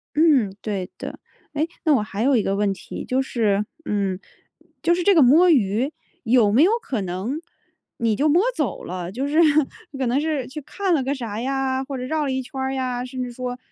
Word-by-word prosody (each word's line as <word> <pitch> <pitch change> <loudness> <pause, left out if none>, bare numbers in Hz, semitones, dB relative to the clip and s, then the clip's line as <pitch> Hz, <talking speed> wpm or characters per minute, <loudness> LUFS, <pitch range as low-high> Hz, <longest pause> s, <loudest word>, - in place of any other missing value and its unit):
嗯， 280 -11 +4
对 195 -4 -3
的。 - - -7 0.3
诶， 305 +2 0 0.2
那 310 - +4
我 225 - +2
还 210 +1 -3
有 270 0 +4
一 220 - +2
个 195 - 0
问 205 0 +1
题， - - -8
就 260 +1 +1
是 210 -6 0 0.2
嗯， 195 -3 -1 0.6
就 340 +1 +3
是 355 - -1
这 400 - +5
个 320 - +7
摸 315 +8 +6
鱼， 240 - +2 0.3
有 230 -3 +4
没 250 +8 +5
有 380 - +5
可 245 -6 -3
能 190 - -3 0.6
你 230 -2 +1
就 290 +8 +2
摸 340 +6 +4
走 - - -2
了， 180 0 -5
就 265 +6 -2
是 305 +3 +2 0.6
可 265 - -1
能 255 +4 +2
是 305 -5 -1
去 300 +3 -7
看 385 +6 -1
了 290 -5 +2
个 270 +2 -1
啥 230 -6 -5
呀， 265 0 -1
或 270 -1 -5
者 250 - -5
绕 310 +3 -1
了 270 - -1
一 260 - -1
圈 265 +1 -8
儿 265 0 -1
呀， 255 -2 -2
甚 255 0 -4
至 245 - -5
说， 250 0 -5
255 Hz, 230 characters per minute, -23 LUFS, 215-285 Hz, 0.6 s, 个